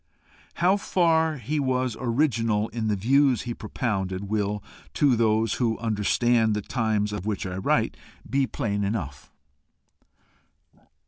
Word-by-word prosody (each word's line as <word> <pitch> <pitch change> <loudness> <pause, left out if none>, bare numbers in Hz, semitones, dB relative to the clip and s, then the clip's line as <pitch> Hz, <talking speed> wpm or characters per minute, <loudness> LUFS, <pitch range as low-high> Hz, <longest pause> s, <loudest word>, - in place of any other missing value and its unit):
How 185 +4 +3
far 160 -5 +2
he 140 +5 -2
was 130 -3 0
original 115 -4 +1
in 115 -1 -3
the 105 - +1
views 130 +4 +3
he 120 - -4
propounded, 100 -4 -3
will, 105 -1 -1 0.3
to 140 -4 +4
those 110 -1 +2
who 115 -2 +1
understand 110 +1 +1
the 105 - -3
times 110 -4 -1
of 105 -1 -5
which 105 -2 -2
I 90 0 -4
write, 95 - +1 0.3
be 135 -1 +1
plain 105 -7 -2
enough. 90 - -4
115 Hz, 130 wpm, -25 LUFS, 105-130 Hz, 0.3 s, to